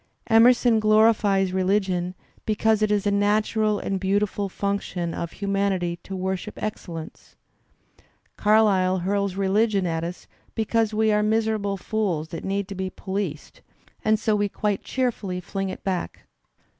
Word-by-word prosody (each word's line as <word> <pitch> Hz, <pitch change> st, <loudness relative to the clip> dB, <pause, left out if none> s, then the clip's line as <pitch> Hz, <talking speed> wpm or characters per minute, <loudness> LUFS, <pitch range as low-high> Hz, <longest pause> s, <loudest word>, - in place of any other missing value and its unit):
Emerson 235 Hz, 0 st, +5 dB
glorifies 215 Hz, -3 st, +3 dB
religion 185 Hz, -1 st, 0 dB, 0.3 s
because 220 Hz, 0 st, +1 dB
it 215 Hz, -, +2 dB
is 205 Hz, -1 st, +1 dB
a 205 Hz, -, +2 dB
natural 210 Hz, +1 st, +1 dB
and 195 Hz, -1 st, -2 dB
beautiful 200 Hz, +1 st, 0 dB
function 190 Hz, -4 st, -3 dB
of 170 Hz, -1 st, -5 dB
humanity 195 Hz, -3 st, -1 dB
to 195 Hz, -, -7 dB
worship 190 Hz, +2 st, -3 dB
excellence. 170 Hz, -6 st, -7 dB, 1.0 s
Carlyle 205 Hz, -4 st, +3 dB
hurls 200 Hz, -1 st, 0 dB
religion 200 Hz, +1 st, +1 dB
at 165 Hz, -1 st, -1 dB
us 175 Hz, +2 st, -6 dB, 0.3 s
because 225 Hz, 0 st, +1 dB
we 220 Hz, 0 st, +2 dB
are 210 Hz, 0 st, +3 dB
miserable 215 Hz, -2 st, 0 dB
fools 180 Hz, -6 st, -2 dB
that 165 Hz, -, -6 dB
need 195 Hz, 0 st, -2 dB
to 200 Hz, -, -6 dB
be 190 Hz, 0 st, -3 dB
policed, 190 Hz, -5 st, -5 dB, 0.4 s
and 215 Hz, 0 st, +3 dB
so 215 Hz, -1 st, +1 dB
we 205 Hz, 0 st, 0 dB
quite 205 Hz, -1 st, -2 dB
cheerfully 230 Hz, -8 st, -2 dB
fling 195 Hz, +2 st, -4 dB
it 185 Hz, -, -8 dB
back. 185 Hz, -2 st, -3 dB
200 Hz, 140 wpm, -24 LUFS, 190-215 Hz, 1.0 s, Emerson